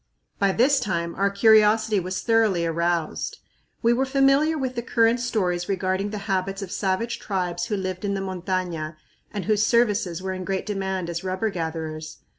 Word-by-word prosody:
By 200 Hz, -1 st, +3 dB
this 265 Hz, +7 st, +3 dB
time 170 Hz, -6 st, -2 dB
our 200 Hz, +1 st, +1 dB
curiosity 215 Hz, +1 st, +4 dB
was 185 Hz, +1 st, -3 dB
thoroughly 220 Hz, -7 st, +2 dB
aroused. 170 Hz, 0 st, -1 dB, 0.5 s
We 235 Hz, +1 st, +5 dB
were 265 Hz, +3 st, +1 dB
familiar 275 Hz, +4 st, +3 dB
with 260 Hz, -3 st, -2 dB
the 235 Hz, -, -3 dB
current 230 Hz, 0 st, +2 dB
stories 185 Hz, -7 st, -1 dB
regarding 190 Hz, +1 st, 0 dB
the 210 Hz, -, -4 dB
habits 195 Hz, 0 st, -1 dB
of 185 Hz, -, -8 dB
savage 205 Hz, +4 st, -1 dB
tribes 180 Hz, -3 st, -2 dB
who 210 Hz, -3 st, -1 dB
lived 185 Hz, 0 st, -4 dB
in 200 Hz, -1 st, -1 dB
the 195 Hz, -, -2 dB
montaña 180 Hz, -4 st, -3 dB, 0.4 s
and 205 Hz, -2 st, -4 dB
whose 215 Hz, -1 st, +2 dB
services 210 Hz, -7 st, +2 dB
were 190 Hz, 0 st, -3 dB
in 185 Hz, 0 st, -5 dB
great 190 Hz, 0 st, -2 dB
demand 190 Hz, -3 st, -2 dB
as 170 Hz, +1 st, -4 dB
rubber 190 Hz, +3 st, -1 dB
gatherers. 160 Hz, -2 st, -5 dB
195 Hz, 175 wpm, -24 LUFS, 180-220 Hz, 0.5 s, We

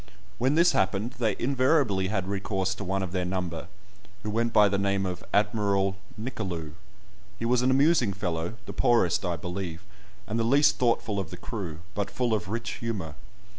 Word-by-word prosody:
When 130 Hz, +4 st, +2 dB
this 170 Hz, +2 st, +6 dB
happened, 95 Hz, +4 st, +1 dB
they 110 Hz, -4 st, +1 dB
invariably 130 Hz, -6 st, +2 dB
had 95 Hz, -2 st, -1 dB
recourse 95 Hz, -1 st, -1 dB
to 100 Hz, -, -7 dB
one 95 Hz, 0 st, -1 dB
of 90 Hz, -, -4 dB
their 90 Hz, -1 st, 0 dB
number, 90 Hz, -3 st, -3 dB, 0.6 s
who 105 Hz, -, -2 dB
went 115 Hz, +2 st, +1 dB
by 105 Hz, -2 st, +6 dB
the 100 Hz, 0 st, 0 dB
name 100 Hz, -1 st, +1 dB
of 90 Hz, -1 st, -4 dB
"Admiral 100 Hz, -2 st, +2 dB, 0.2 s
Nicolou." 95 Hz, -, -4 dB, 0.7 s
He 115 Hz, -, -3 dB
was 125 Hz, +1 st, +3 dB
an 125 Hz, -, +3 dB
amusing 135 Hz, -4 st, +4 dB
fellow, 90 Hz, -1 st, -3 dB
the -, -, -7 dB
poorest, 115 Hz, -8 st, +3 dB
I 90 Hz, -2 st, 0 dB
believe, 90 Hz, +1 st, -5 dB, 0.4 s
and 110 Hz, +2 st, -2 dB
the -, -, +2 dB
least 140 Hz, +6 st, +4 dB
thoughtful 115 Hz, -4 st, +1 dB
of 95 Hz, -4 st, -4 dB
the 90 Hz, -, -8 dB
crew, 90 Hz, -6 st, -6 dB
but 100 Hz, -1 st, -2 dB
full 120 Hz, -3 st, 0 dB
of 100 Hz, -4 st, -1 dB
rich 115 Hz, +1 st, -3 dB
humour. 100 Hz, -10 st, -3 dB
100 Hz, 180 wpm, -27 LUFS, 95-115 Hz, 0.7 s, this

